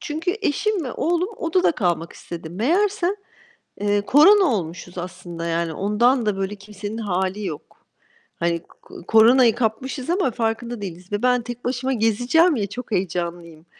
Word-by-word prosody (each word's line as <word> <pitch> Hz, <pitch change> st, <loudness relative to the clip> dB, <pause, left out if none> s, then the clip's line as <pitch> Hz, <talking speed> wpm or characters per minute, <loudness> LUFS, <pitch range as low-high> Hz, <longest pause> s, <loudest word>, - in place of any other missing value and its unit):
çünkü 320 Hz, +5 st, -2 dB
eşim 400 Hz, +3 st, 0 dB
ve 255 Hz, -, -4 dB
oğlum 345 Hz, +4 st, 0 dB
odada 335 Hz, +2 st, +2 dB
kalmak 175 Hz, -, -1 dB
istedi. 170 Hz, -2 st, -8 dB
Meğerse, 360 Hz, -, +1 dB, 0.7 s
eee, 205 Hz, 0 st, +2 dB
korona 350 Hz, -, +6 dB
olmuşuz 180 Hz, -, -3 dB
aslında. 175 Hz, -1 st, -6 dB
Yani 165 Hz, -1 st, -1 dB
ondan 230 Hz, -, +2 dB
da 210 Hz, -2 st, 0 dB
böyle 195 Hz, +1 st, -2 dB
kimsenin 205 Hz, +1 st, -7 dB
hâli 195 Hz, -1 st, -2 dB
yok. 155 Hz, -5 st, -4 dB, 0.8 s
Hani 170 Hz, 0 st, 0 dB
ko -, -, -15 dB
koronayı 230 Hz, +1 st, +6 dB
kapmışız 250 Hz, +4 st, -2 dB
ama 350 Hz, -7 st, +1 dB
farkında 230 Hz, 0 st, -2 dB
değiliz. 180 Hz, -1 st, -8 dB
Ve 205 Hz, +3 st, -2 dB
ben 250 Hz, -1 st, +3 dB
tek 240 Hz, +1 st, -8 dB
başıma 260 Hz, +2 st, -1 dB
gezeceğim 245 Hz, -, +3 dB
ya, 205 Hz, -5 st, -1 dB
çok 245 Hz, +4 st, -8 dB
heyecanlıyım. 170 Hz, -3 st, -3 dB
220 Hz, 150 wpm, -22 LUFS, 185-265 Hz, 0.8 s, korona